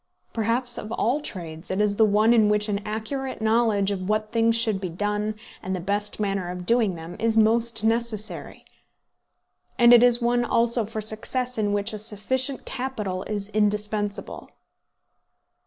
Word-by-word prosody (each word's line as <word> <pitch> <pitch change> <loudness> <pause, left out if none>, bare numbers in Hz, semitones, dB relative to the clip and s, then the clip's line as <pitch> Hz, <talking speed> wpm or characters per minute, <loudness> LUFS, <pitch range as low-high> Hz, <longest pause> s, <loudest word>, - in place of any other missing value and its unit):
Perhaps 240 +2 0
of 215 - -8
all 255 +7 0
trades 165 - -7
it 185 - -2
is 210 -1 +1
the 220 - +6
one 215 +2 +4
in 220 -3 +4
which 210 0 +2
an 205 -1 -2
accurate 260 +5 -4
knowledge 220 -2 +2
of 185 -1 -4
what 215 0 0
things 230 0 +2
should 220 -4 0
be 185 - -3
done, 210 +4 -2 0.3
and 190 +1 -3
the - - -3
best 205 +4 -2
manner 195 -3 -1
of 180 0 -6
doing 225 -3 +2
them, 165 +1 -9
is 225 0 +1
most 225 0 +3
necessary. 225 -1 -3 1.1
And 240 0 +7
it 240 - +8
is 245 -1 +5
one 240 0 +1
also 235 -1 +3
for 220 +1 -5
success 235 +3 -2
in 205 -1 +1
which 205 +2 0
a 215 - -5
sufficient 250 +6 -1
capital 220 -8 -4
is 205 -1 -4
indispensable. 210 -1 -1
215 Hz, 165 wpm, -24 LUFS, 205-235 Hz, 1.1 s, it